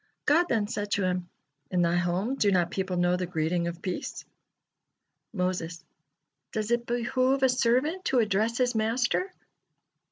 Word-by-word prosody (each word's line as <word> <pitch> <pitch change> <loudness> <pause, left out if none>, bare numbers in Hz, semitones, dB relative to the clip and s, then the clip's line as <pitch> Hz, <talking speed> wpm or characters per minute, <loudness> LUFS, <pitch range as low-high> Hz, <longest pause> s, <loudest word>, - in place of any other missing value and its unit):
God 330 +4 +4
then 220 -3 +2
said 205 -1 -3
to 200 - +1
him: 180 -1 -1 0.4
"In 180 -1 +2
thy 170 0 +2
home, 175 +7 0
do 210 -7 +2
not 175 -2 +2
people 190 -2 -2
know 175 0 +3
the 180 -1 -3
greeting 170 +1 0
of 170 0 -6
peace?" 185 - -4 1.1
Moses: 180 -3 -3 0.7
"Does 215 +1 -2
it 235 0 +1
behoove 255 +3 +1
a 265 - +6
servant 260 +9 +1
to 265 - +2
address 220 +1 +2
his 250 -1 +2
Master?" 240 - 0
210 Hz, 155 wpm, -28 LUFS, 180-245 Hz, 1.1 s, a